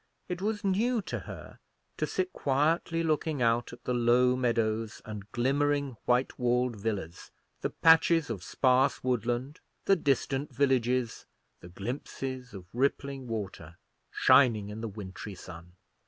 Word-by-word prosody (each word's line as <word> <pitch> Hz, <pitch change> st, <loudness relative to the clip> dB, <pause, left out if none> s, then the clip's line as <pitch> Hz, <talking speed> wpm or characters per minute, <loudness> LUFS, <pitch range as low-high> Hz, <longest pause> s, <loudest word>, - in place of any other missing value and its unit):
It 180 Hz, 0 st, -4 dB
was 210 Hz, +1 st, -1 dB
new 220 Hz, +5 st, +2 dB
to -, -, -4 dB
her -, -, -10 dB, 0.4 s
to -, -, -1 dB
sit 375 Hz, 0 st, -2 dB
quietly 160 Hz, +4 st, +1 dB
looking 155 Hz, -2 st, 0 dB
out 120 Hz, 0 st, +2 dB
at 120 Hz, 0 st, -12 dB
the 125 Hz, -, -1 dB
low 125 Hz, +1 st, +4 dB
meadows 115 Hz, -3 st, 0 dB
and 105 Hz, -1 st, -8 dB
glimmering 140 Hz, +2 st, +1 dB
white 125 Hz, +2 st, +1 dB
walled 125 Hz, 0 st, +1 dB
villas, 100 Hz, -6 st, -4 dB, 0.3 s
the -, -, -1 dB
patches 165 Hz, -3 st, +4 dB
of 100 Hz, -6 st, -4 dB
sparse 130 Hz, +7 st, +2 dB
woodland, 125 Hz, +3 st, -1 dB, 0.3 s
the 195 Hz, -, +5 dB
distant 140 Hz, -2 st, 0 dB
villages, 125 Hz, -3 st, +1 dB, 0.3 s
the 85 Hz, -, -12 dB
glimpses 125 Hz, +5 st, -5 dB
of 95 Hz, -2 st, -9 dB
rippling 135 Hz, +1 st, -1 dB
water, 95 Hz, -7 st, -6 dB, 0.3 s
shining 120 Hz, -6 st, +4 dB
in 105 Hz, +2 st, -6 dB
the 115 Hz, -, -3 dB
wintry 100 Hz, 0 st, -8 dB
sun. 85 Hz, -1 st, -11 dB
125 Hz, 140 wpm, -29 LUFS, 110-140 Hz, 0.4 s, the